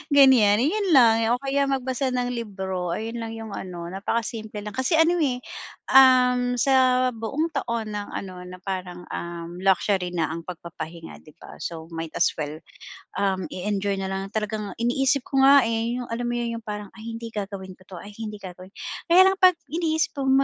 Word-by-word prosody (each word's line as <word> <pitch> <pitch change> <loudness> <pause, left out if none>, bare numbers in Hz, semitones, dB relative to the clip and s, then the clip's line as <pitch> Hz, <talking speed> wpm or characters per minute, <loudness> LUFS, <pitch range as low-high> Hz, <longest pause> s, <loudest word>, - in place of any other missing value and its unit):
ganyan. 235 -7 +6
'Yon 380 +4 +1
lang 230 -4 +7 0.2
o 250 - -8
kaya 275 +1 +1
magbasa 260 -1 -1
ng 250 0 0
libro. 190 -6 -3
Ayun 225 +2 -4
lang 225 -1 -5
'yong 225 -1 -7
ano, 175 -2 -6
napakasimple 215 +2 -3
lang. 210 -1 -7
Kasi 260 +5 0
ano, 335 +2 +4
eh, 255 -5 0 0.5
um, 250 -2 +6
sa 255 -1 +4
buong 275 +9 -2
taon 230 -5 -2
ng 205 0 -4
ano, 185 -2 -6
na 180 0 -9
parang, 180 -2 -5
um, 170 0 -6
luxury 190 -1 +1
na 165 -3 0
ang 165 +1 -6
pagpapahinga, 170 -1 -8
'di 155 - -16
ba? - - -11
So, 165 -1 -6
might 165 -1 -6
as - - +3
well, 150 0 -4 0.6
um, 190 -2 0
i-enjoy 200 +1 -2
na 190 0 -3
lang 195 0 -3
talagang 210 -2 -3
iniisip 260 +3 +1
ko 270 - +1
nga, 275 -1 +7
eh, 230 +1 -1
'yong, 245 -1 -5
alam 240 +1 -2
mo 240 - -1
'yon, 235 -1 -2
'yong 230 - -16
parang, 210 -1 -5
"Ay 225 +1 -8
hindi 230 0 -8
gagawin 195 -3 -5
ko - - -19
'to. 185 - -9
Ay 205 - -11
hindi 215 -1 -5
gagawin." 185 0 -10 0.4
Kaya 375 +3 +7
lang - - -4
'pag 370 -2 +6 0.2
iniisip 320 -1 0
kong 270 -1 +1
220 Hz, 190 wpm, -24 LUFS, 190-255 Hz, 0.6 s, lang